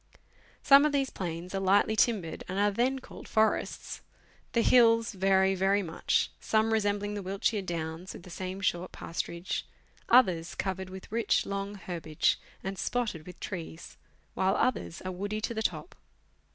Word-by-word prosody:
Some 280 0 +8
of 300 -1 +2
these 275 -2 +1
plains 175 0 -5
are 195 - 0
lightly 200 +3 +3
timbered, 210 -8 +1
and 185 - -4
are 205 +1 +3
then 250 +6 +1
called 265 - -11
forests. 220 0 0 0.5
The 235 - +3
hills 230 -2 +5
vary 190 -1 +3
very 195 +2 +2
much, 165 -2 0
some 220 0 +1
resembling 205 -1 0
the 205 - -4
Wiltshire 195 +3 -1
downs, 170 0 -5
with - - -11
the 180 - -12
same 185 +2 -5
short 180 -2 -1
pasturage; 170 +1 -4 0.5
others 185 -9 +4
covered 190 -1 -3
with 190 +1 -10
rich, 230 +1 +1
long 200 +1 -4
herbage, 170 -5 -1 0.2
and 195 -1 -4
spotted 215 -10 -2
with 180 - -11
trees; 165 -3 -7 0.4
while 190 +1 +1
others 245 -9 -1
are 185 - -3
woody 205 +4 -3
to 235 - -2
the 220 - -2
top. 275 - -2
195 Hz, 160 wpm, -29 LUFS, 180-220 Hz, 0.5 s, Some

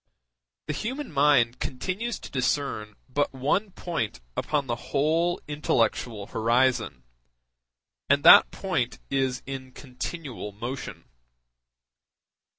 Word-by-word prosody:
The 150 - -2
human 260 - -4
mind 140 -5 +3
continues 190 - -3
to - - -9
discern 125 -5 -1
but 145 +2 0
one 150 +11 +1
point 165 - -3 0.2
upon 150 -2 0
the 120 -2 -1
whole 160 +5 +1
intellectual 120 -7 0
horizon, 115 - +1 1.1
and 140 +1 +4
that - - +9
point 180 -11 -2
is 135 -2 0
in 130 -1 -7
continual 130 -4 -6
motion. 120 +6 -6
135 Hz, 100 wpm, -26 LUFS, 120-155 Hz, 1.1 s, that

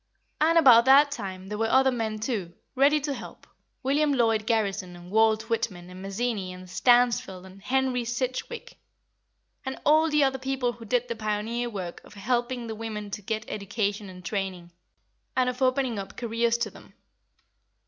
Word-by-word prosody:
And 325 +2 +4
about 245 -7 +7
that 280 +2 +6
time 190 -7 -6
there 210 +1 -5
were 225 0 +1
other 265 +1 +4
men 225 -3 -2
too, 210 -7 -3 0.2
ready 280 +3 +4
to 285 0 -2
help, - - -10 0.4
William 290 +3 +2
Lloyd 225 -5 +2
Garrison 200 -5 0
and 175 +1 -12
Walt 220 0 +3
Whitman 185 -6 -3
and 185 +1 -10
Mazzini 195 -1 -2
and 185 0 -10
Stansfeld 230 -3 +2
and 190 +1 -14
Henry 260 +1 0
Sidgwick, 255 - -4 0.8
and 265 0 -5
all 310 +2 +5
the 300 -1 +3
other 265 -1 +1
people 265 -2 -1
who 235 -1 -12
did 245 +3 0
the 235 - -3
pioneer 220 +3 -2
work 185 -6 -6
of - - -16
helping 240 +3 -1
the 225 - -5
women 215 -2 -6
to 210 - -5
get 220 +2 -3
education 205 0 -3
and 180 -1 -12
training, 185 -4 -4 0.7
and 250 -1 +3
of 250 +1 -13
opening 255 -3 +1
up 195 - -8
careers 235 0 0
to 235 - -2
them. - - -16
230 Hz, 170 wpm, -27 LUFS, 200-255 Hz, 0.8 s, about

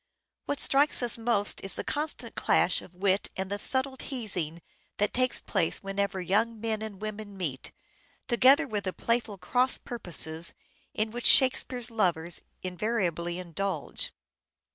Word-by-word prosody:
What 285 - -2
strikes 280 -1 +4
us 235 -1 0
most 225 -3 +1
is 195 - +3
the - - -4
constant 300 +1 -3
clash - - +2
of 175 - -15
wit 195 +1 0
and 190 0 -4
the 205 - -3
subtle 265 +3 +2
teasing 185 - -2 0.3
that 205 0 0
takes 255 0 +2
place 165 - -1
when 195 0 -5
ever 200 -1 -1
young 215 +5 0
men 220 -1 -2
and 215 -3 -7
women 215 -1 -7
meet, 145 -8 -5 0.6
together 260 +4 +5
with 210 -4 -4
the 185 - -2
playful 230 -3 -1
cross 250 +6 +1
purposes 170 -7 +1 0.4
in 215 0 -1
which 240 +1 0
Shakespeare's 255 -2 +4
lovers 175 -6 0 0.2
invariably 180 -3 -2
indulge. 185 +2 -3
210 Hz, 145 wpm, -28 LUFS, 185-240 Hz, 0.6 s, together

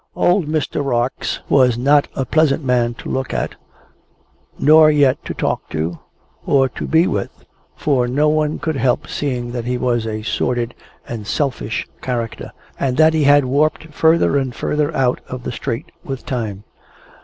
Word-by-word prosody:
Old 175 -2 +2
Mr. 155 -1 -1
Rarx 125 -1 -1
was 125 -4 +4
not 145 +4 +3
a 135 - -1
pleasant 155 +2 +2
man 120 -2 +1
to - - -10
look 130 -1 -2
at, - - -2 1.0
nor 155 +1 +6
yet 145 -3 +3
to - - -5
talk - - -2
to, 80 +2 -3 0.4
or 135 -2 +3
to - - -6
be 160 +2 +4
with, 100 - -4 0.3
for 130 -5 +1
no 145 +5 +2
one 150 0 +1
could 160 -3 -2
help 135 +4 +1
seeing 125 -4 -3
that 120 -1 -4
he 125 +1 -1
was 120 -2 0
a 110 -1 -4
sordid 120 +1 -1 0.3
and 110 -4 -6
selfish 130 -5 -2
character, 120 -3 -4 0.3
and 130 -2 0
that 160 +1 +5
he 155 -2 +2
had 145 -1 +5
warped 150 +3 0
further 160 -2 +3
and 130 -3 -3
further 150 +1 -1
out 125 -2 +1
of 125 -1 -7
the - - -4
straight 120 -1 -4
with 135 -2 -6
time. 110 -6 -4
130 Hz, 165 wpm, -19 LUFS, 120-150 Hz, 1.0 s, nor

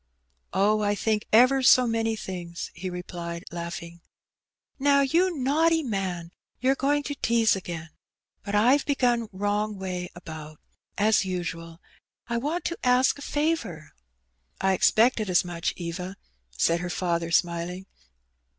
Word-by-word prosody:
Oh, 210 +3 +2
I 205 0 +1
think 215 0 -1
ever 255 +4 +6
so 255 0 +6
many 225 -1 0
things," 175 -4 -6
he 185 - -5
replied, 175 -1 -6
laughing. 170 0 -6 0.8
Now, 280 0 +4
you 335 +5 +2
naughty 320 +5 +2
man, 185 -7 -3 0.3
you^re 265 +2 +2
going 290 +2 +1
to 285 - -3
tease 230 -5 +2
again. 170 -4 -6 0.5
But 205 0 -3
IVe 250 +7 +4
begun 245 -5 +1
wrong 205 +2 -1
way 180 -2 -4
about, 155 -3 -9 0.4
as 210 0 +3
usual. 165 -3 -5 0.5
I 235 0 -1
want 310 +7 -2
to 340 - -3
ask 255 +2 +3
a - - -10
favour." 230 - -2 0.7
''I 190 0 +2
expected 220 +2 +3
as 180 0 +3
much, 170 -1 -2
Eva," 180 +2 -5 0.4
said 165 - +2
her 180 0 -4
father, 170 -2 -1
smiling. 175 +2 0
200 Hz, 135 wpm, -26 LUFS, 175-250 Hz, 0.8 s, ever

